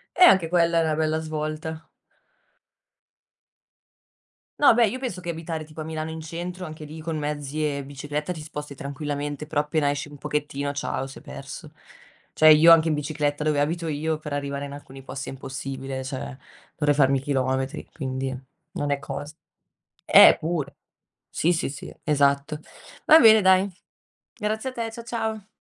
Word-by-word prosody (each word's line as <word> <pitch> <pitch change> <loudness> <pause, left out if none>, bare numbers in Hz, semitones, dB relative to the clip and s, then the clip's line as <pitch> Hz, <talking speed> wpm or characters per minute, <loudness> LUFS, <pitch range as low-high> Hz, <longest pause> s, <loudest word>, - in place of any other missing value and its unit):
Eh, 365 - +7
anche 185 - +6
quella 170 -1 +3
è - - +2
una 155 -1 +1
bella 155 0 +1
svolta. 155 +1 -5 2.7
No, 285 - +7
beh, 230 -2 +4
io 255 - -4
penso 240 -9 -4
che 175 - -4
abitare 165 -1 -4
tipo 155 0 -8
a - - -7
Milano 160 0 -4
in 160 0 -6
centro, 175 +3 -6
anche 155 0 -9
lì 155 +2 -9
con 160 0 -4
mezzi 150 0 -3
e 140 -2 -2
bicicletta 145 +4 -4
ti 155 -3 -8
sposti 150 -2 -7
tranquillamente, 145 +1 -4
però 150 -1 0
appena 150 -1 0
esci 145 +1 -2
un 145 -1 -12
pochettino, 145 -1 -2
ciao, 135 -2 -3
sei 135 - -11
perso. - - -9 0.6
Cioè, 155 - +6
io 155 +2 +9
anche 165 0 +5
in 155 - +1
bicicletta, 150 0 -2
dove 150 -2 +2
abito 165 +3 -1
io, 155 +1 -1
per 150 -2 -7
arrivare 140 0 -3
in 140 - -7
alcuni 135 -2 -11
posti 135 0 -6
è - - -5
impossibile, 135 0 -5
cioè 130 0 -6 0.4
dovrei 145 -1 +2
farmi 135 -2 +4
chilometri, 130 -1 -1
quindi 130 -2 -3 0.4
non 145 0 -2
è 140 - +1
cosa. 145 +1 -6 0.7
Eh, - - +9
pure, 160 -3 -3 0.5
sì, 175 +3 +1
sì, 165 - -1
sì, 135 - -8
esatto. 145 +1 +1 0.5
Va 315 - +9
bene, 220 -4 +8
dai, 190 +1 +4 0.7
grazie 220 +4 -3
a - - -16
te. 230 -2 -3
Cia 230 +1 -9
ciao. 220 -3 -3
150 Hz, 170 wpm, -25 LUFS, 140-165 Hz, 2.7 s, io